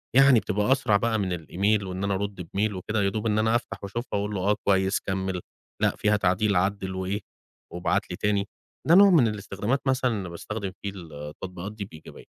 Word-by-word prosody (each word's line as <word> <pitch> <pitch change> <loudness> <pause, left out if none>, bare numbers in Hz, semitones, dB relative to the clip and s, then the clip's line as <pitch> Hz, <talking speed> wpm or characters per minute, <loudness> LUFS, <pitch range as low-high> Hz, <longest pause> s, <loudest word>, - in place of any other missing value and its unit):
يعني 135 -3 +7
بتبقى 105 +4 0
أسرع 110 -6 +4
بقى 110 0 0
من 90 -3 -1
الemail، 100 +4 +1
وإن 95 +1 -4
أنا 100 0 +1
أرد 100 -1 -3
بmail 100 +5 -1
وكده، 105 +3 -2
يا 100 - +3
دوب 110 +2 -4
إن 105 0 +2
أنا 110 +1 +2
أفتح، 120 -3 -3
وأشوفها 110 +2 -3
وأقول 105 0 -3
له 95 - -2
"آه، - - +3
كويس، 95 0 +3
كمّل، 95 -2 -2 0.4
لأ - - +2
فيها 105 0 +2
تعديل، 95 +2 +2
عدّل 95 0 0
وإيه، 95 +2 -2 0.5
وابعت 90 0 -1
لي - - -3
تاني." 105 -1 0 0.4
ده 170 - +7
نوع 200 +1 +9
من 150 -10 +5
الاستخدامات 105 +4 -2
مثلًا، 130 -2 +2
أنا 95 -5 -3
باستخدم 100 +3 -5
فيه 100 - -2
التطبيقات 85 +4 -7
دي 105 -2 -5
بإيجابية، 80 -5 -13
100 Hz, 200 wpm, -26 LUFS, 95-110 Hz, 0.5 s, نوع